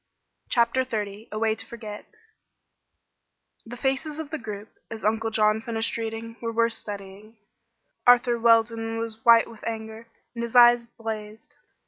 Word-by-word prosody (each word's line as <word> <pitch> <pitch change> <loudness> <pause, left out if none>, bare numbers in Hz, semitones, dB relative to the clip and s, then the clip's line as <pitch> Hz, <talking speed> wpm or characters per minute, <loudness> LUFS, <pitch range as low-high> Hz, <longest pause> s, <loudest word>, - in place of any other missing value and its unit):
CHAPTER 235 +2 +2
XXX 215 -3 -5
A 215 - -4
WAY 220 0 +2
TO 220 - -5
FORGET 215 -3 -9 1.6
The 245 +1 -8
faces 270 +4 -1
of 315 -2 -6
the 315 - -3
group, 210 -1 -7 0.2
as 220 -2 -7
Uncle 220 +1 +1
John 215 0 +2
finished 225 0 -2
reading, 230 0 -5
were 230 -1 -2
worth 230 0 +2
studying. 205 +1 -8 0.7
Arthur 245 -1 +5
Weldon 225 0 +3
was 225 -1 -5
white 230 -1 +7
with 225 -2 -14
anger, 220 0 -6 0.3
and 235 - -5
his 235 +1 -5
eyes 240 -1 +7
blazed. 220 -2 -7
225 Hz, 145 wpm, -25 LUFS, 220-235 Hz, 1.6 s, white